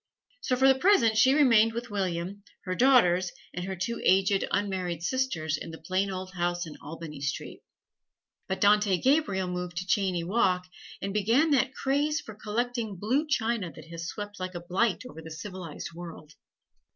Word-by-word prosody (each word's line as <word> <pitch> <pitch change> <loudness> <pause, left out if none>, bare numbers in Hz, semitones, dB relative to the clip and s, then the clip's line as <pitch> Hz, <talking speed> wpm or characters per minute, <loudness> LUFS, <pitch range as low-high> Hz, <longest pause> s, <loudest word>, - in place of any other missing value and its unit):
So 255 - 0
for 265 +2 +4
the 270 - +7
present 260 - +4
she 260 +5 +5
remained 230 -6 +5
with 235 0 -5
William, 190 0 -2 0.2
her 185 - -1
daughters, 185 -7 +4 0.2
and 180 0 -4
her 190 0 -4
two 190 +6 -3
aged 195 +1 +3
unmarried 185 -4 -2
sisters 175 - -1
in - - -6
the 160 - -8
plain 185 +4 -1
old 185 0 -5
house 175 -1 -1
in 155 - -9
Albany 150 -1 -8
Street. 140 0 -4 0.9
But 190 - -2
Dante 205 -2 +4
Gabriel 260 - +2
moved 180 -1 -4
to 185 - -2
Cheyne 185 -3 0
Walk, 185 -4 +1 0.4
and 195 0 -2
began 230 +10 +3
that 265 -1 +2
craze 290 +3 +1
for 220 - -10
collecting 225 +1 -3
blue 255 - 0
china 225 - 0
that 160 +1 -12
has 170 0 -5
swept 205 +1 -6
like 185 0 -5
a 175 - -4
blight 185 +6 0
over 160 - -10
the 160 - -10
civilized 175 -1 -7
world. 165 -3 -10
195 Hz, 175 wpm, -28 LUFS, 175-235 Hz, 0.9 s, the